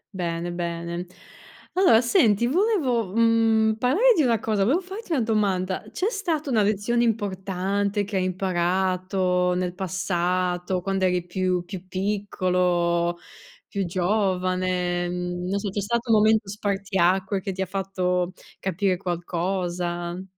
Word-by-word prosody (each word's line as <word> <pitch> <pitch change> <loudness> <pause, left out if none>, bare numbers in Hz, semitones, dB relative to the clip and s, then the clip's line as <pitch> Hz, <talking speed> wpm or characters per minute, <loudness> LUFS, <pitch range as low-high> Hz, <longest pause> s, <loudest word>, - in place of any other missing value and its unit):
Bene, 170 -1 -2
bene. 170 0 -4 0.7
Allora, 360 -12 +5
senti, 235 - +3
volevo, 260 - +1
mhmm, 225 -1 +3
parlare 400 - +4
di 320 - +3
una 235 -4 +3
cosa, 215 -3 -1
volevo 280 - +3
farti 385 +1 -9
una 275 -6 +2
domanda: 195 -4 0
c'è 365 - -1
stata 330 - -2
una 220 -3 +3
lezione 210 +4 +1
importante 200 -1 -1
che 200 0 -3
hai 185 - +1
imparato 185 0 0
nel 180 -1 -1
passato, 180 -1 -1
quando 195 0 0
eri 180 -1 +1
più 180 0 -1
più 185 0 -8
piccolo, 180 -3 0 0.5
più 200 -1 -2
giovane, 185 -1 0
n 180 0 -3
non 195 +2 0
so, 200 0 -3
c'è 205 - -2
stato 235 +3 -1
un 220 - +6
momento 215 -1 +3
spartiacque 195 -1 0
che 195 - -3
ti 190 0 -2
ha - - -3
fatto 185 -1 -1 0.3
capire 190 0 0
qualcosa? 175 0 -3
190 Hz, 135 wpm, -24 LUFS, 180-215 Hz, 0.7 s, un